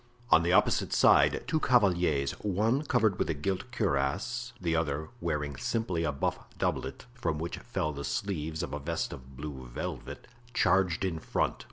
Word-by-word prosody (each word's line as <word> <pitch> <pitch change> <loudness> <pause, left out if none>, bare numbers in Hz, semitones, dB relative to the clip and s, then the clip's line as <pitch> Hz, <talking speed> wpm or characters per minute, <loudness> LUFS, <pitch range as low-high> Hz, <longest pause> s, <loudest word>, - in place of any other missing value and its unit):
On 80 - +8
the 85 +1 +1
opposite 90 - +3
side - - +5
two 160 0 +1
cavaliers, 90 - +3
one 105 +7 +1
covered 115 -9 +2
with - - 0
a 80 - +1
gilt 95 - -3
cuirass, 105 - -1
the 85 -3 0
other 75 -1 -1
wearing 75 -6 -2
simply 90 - -1
a 75 - +1
buff 70 - -1 0.2
doublet, 65 0 -2
from 120 -11 -2
which 85 +2 -4
fell 95 -10 -2
the 70 0 -5
sleeves 80 +2 -2
of 85 - -5
a 75 - -2
vest 80 +3 -2
of 65 0 -12
blue 70 -3 -6
velvet, - - -6 0.3
charged 95 -2 +3
in 85 -4 -2
front. - - 0
85 Hz, 170 wpm, -30 LUFS, 75-100 Hz, 0.3 s, On